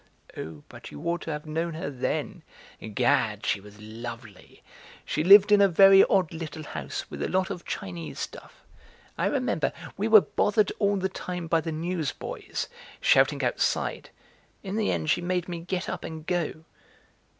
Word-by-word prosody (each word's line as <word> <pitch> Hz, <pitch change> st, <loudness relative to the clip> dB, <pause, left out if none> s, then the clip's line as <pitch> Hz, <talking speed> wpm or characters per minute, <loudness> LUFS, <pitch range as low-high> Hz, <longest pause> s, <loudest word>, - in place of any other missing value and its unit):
"Oh, 80 Hz, -2 st, -8 dB
but -, -, -11 dB
you -, -, -10 dB
ought 170 Hz, 0 st, -1 dB
to 165 Hz, -, -5 dB
have 150 Hz, 0 st, -5 dB
known 160 Hz, +2 st, -2 dB
her 155 Hz, -3 st, -4 dB
then; 130 Hz, -2 st, -3 dB, 0.5 s
Gad, 120 Hz, -4 st, +1 dB
she 100 Hz, -, 0 dB
was 105 Hz, +1 st, -15 dB
lovely! 115 Hz, -1 st, -10 dB, 0.4 s
She 155 Hz, -, -1 dB
lived 200 Hz, +3 st, +8 dB
in 205 Hz, -1 st, +7 dB
a 200 Hz, -, +7 dB
very 195 Hz, +2 st, +7 dB
odd 185 Hz, -5 st, +1 dB
little 155 Hz, -1 st, -6 dB
house -, -, -5 dB
with -, -, -6 dB
a -, -, -1 dB
lot 190 Hz, +1 st, 0 dB
of 180 Hz, -3 st, -7 dB
Chinese 85 Hz, -6 st, -6 dB
stuff. -, -, -8 dB, 0.5 s
I -, -, 0 dB
remember, -, -, 0 dB, 0.3 s
we 205 Hz, +3 st, 0 dB
were 220 Hz, -2 st, +8 dB
bothered 210 Hz, +1 st, +1 dB
all 200 Hz, 0 st, +2 dB
the 190 Hz, 0 st, 0 dB
time 180 Hz, -2 st, -5 dB
by 165 Hz, 0 st, +2 dB
the 160 Hz, -, -4 dB
newsboys, 160 Hz, -1 st, -4 dB, 0.3 s
shouting -, -, +3 dB
outside; -, -, -1 dB, 0.5 s
in 195 Hz, 0 st, -4 dB
the 220 Hz, -1 st, +1 dB
end 155 Hz, -, 0 dB
she 175 Hz, -, +1 dB
made 180 Hz, 0 st, -1 dB
me 175 Hz, -2 st, -4 dB
get 180 Hz, +2 st, -3 dB
up 180 Hz, -, -4 dB
and 160 Hz, -1 st, -7 dB
go." 170 Hz, -3 st, -2 dB
165 Hz, 170 wpm, -27 LUFS, 145-190 Hz, 0.5 s, lived